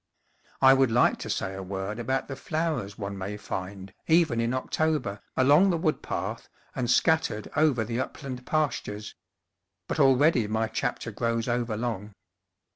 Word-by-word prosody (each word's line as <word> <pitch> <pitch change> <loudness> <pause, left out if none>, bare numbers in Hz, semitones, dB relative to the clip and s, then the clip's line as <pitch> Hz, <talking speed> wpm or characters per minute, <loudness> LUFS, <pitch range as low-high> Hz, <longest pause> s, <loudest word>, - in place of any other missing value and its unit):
I 135 0 +9
would 135 -2 +4
like 120 +2 +3
to - - -6
say 95 - -2
a 95 - -6
word 95 +3 -4
about 130 +3 -1
the 135 - -5
flow 160 +3 -1
ers 100 0 -8
one 100 -1 -4
may 100 +2 -4
find, 95 -1 -6
even 160 -8 +3
in 115 +1 0
October, 130 -5 -1 0.2
along 145 +9 +5
the 175 - +1
wood 160 -2 0
path - - -4 0.3
and 120 -2 -1
scattered 140 -6 +2
over 145 -7 +3
the 115 +2 -3
upland 130 -1 -5
pastures; 110 -9 -2 0.7
but - - -3
already 135 -3 +4
my 110 +1 0
chapter - - -3
grows 115 0 -1
overlong. 115 -3 -2
120 Hz, 155 wpm, -27 LUFS, 105-145 Hz, 0.7 s, I